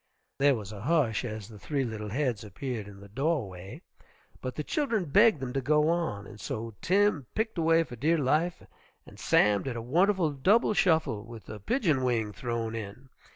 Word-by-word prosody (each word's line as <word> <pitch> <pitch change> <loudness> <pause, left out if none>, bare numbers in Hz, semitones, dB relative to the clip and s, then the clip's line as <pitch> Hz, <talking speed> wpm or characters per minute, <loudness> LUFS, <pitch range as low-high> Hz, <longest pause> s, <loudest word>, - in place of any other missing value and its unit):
There 140 0 +5
was 105 -3 -7
a 100 -2 -8
hush 130 -5 +1
as 110 -3 -5
the 110 -3 -12
three 140 +2 -1
little 110 -3 -5
heads 125 -2 -1
appeared 110 +1 -5
in 100 -1 -12
the 100 - -11
doorway, 105 - -3 0.6
but 130 - -5
the 150 - -3
children 235 - 0
begged 205 +4 +5
them 125 -1 -4
to 135 - 0
go 150 +3 +3
on, 165 -13 -1
and 105 - -12
so 115 -4 -4
Tim 190 - +2
picked 220 -4 -1
away 165 0 +4
for 125 - -9
dear 155 +8 +2
life 155 +5 0 0.4
and - - -15
Sam 105 -1 +3
did 130 -3 -4
a 115 - -4
wonderful 175 - +2
double 195 - +3
shuffle 160 - +2
with 115 -4 -11
the 105 - -8
pigeon 155 - +1
wing 115 -4 0
thrown 115 -1 -3
in. 115 +4 -7
130 Hz, 190 wpm, -29 LUFS, 110-165 Hz, 0.6 s, There